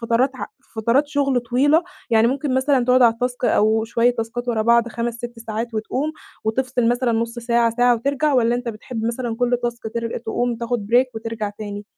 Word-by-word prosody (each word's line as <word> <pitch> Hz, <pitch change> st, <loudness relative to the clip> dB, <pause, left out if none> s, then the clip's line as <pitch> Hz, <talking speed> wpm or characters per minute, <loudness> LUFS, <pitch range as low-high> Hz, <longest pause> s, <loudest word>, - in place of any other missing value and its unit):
فترات 235 Hz, +3 st, +2 dB
ع -, -, -5 dB, 0.2 s
في -, -, -32 dB
فترات 240 Hz, +7 st, +2 dB
شغل 280 Hz, -3 st, +1 dB
طويلة، 270 Hz, +7 st, +3 dB, 0.3 s
يعني 225 Hz, 0 st, +5 dB
ممكن 265 Hz, +2 st, -1 dB
مثلًا 260 Hz, -1 st, +2 dB
تقعد 250 Hz, +1 st, +4 dB
على 235 Hz, -1 st, +6 dB
التاسك 250 Hz, +1 st, -3 dB
أو 220 Hz, -1 st, +3 dB
شوية 230 Hz, +1 st, +2 dB
تاسكات 240 Hz, +1 st, -4 dB
ورا 225 Hz, -2 st, +1 dB
بعض 235 Hz, +1 st, +3 dB
5، 235 Hz, 0 st, -3 dB
6 240 Hz, 0 st, -8 dB
ساعات 225 Hz, +1 st, -5 dB
وتقوم 260 Hz, +8 st, -2 dB, 0.3 s
وتفصل 245 Hz, +1 st, 0 dB
مثلًا 245 Hz, 0 st, +1 dB
نُص 230 Hz, +1 st, -2 dB
ساعة، 235 Hz, -1 st, +2 dB
ساعة 245 Hz, 0 st, +4 dB
وترجع، 280 Hz, +5 st, 0 dB
والَّا 240 Hz, -1 st, +3 dB
أنت 245 Hz, 0 st, -3 dB
بتحب 225 Hz, +1 st, -5 dB
مثلًا 235 Hz, 0 st, -2 dB
كُلّ 245 Hz, 0 st, +1 dB
تاسك 240 Hz, 0 st, -3 dB
تر 230 Hz, -1 st, -2 dB
تقوم 240 Hz, +1 st, -2 dB
تاخد 235 Hz, -2 st, -3 dB
break 250 Hz, +2 st, +5 dB
وترجع 220 Hz, -2 st, -4 dB
تاني؟ 205 Hz, -1 st, -6 dB
235 Hz, 195 wpm, -21 LUFS, 230-250 Hz, 0.3 s, على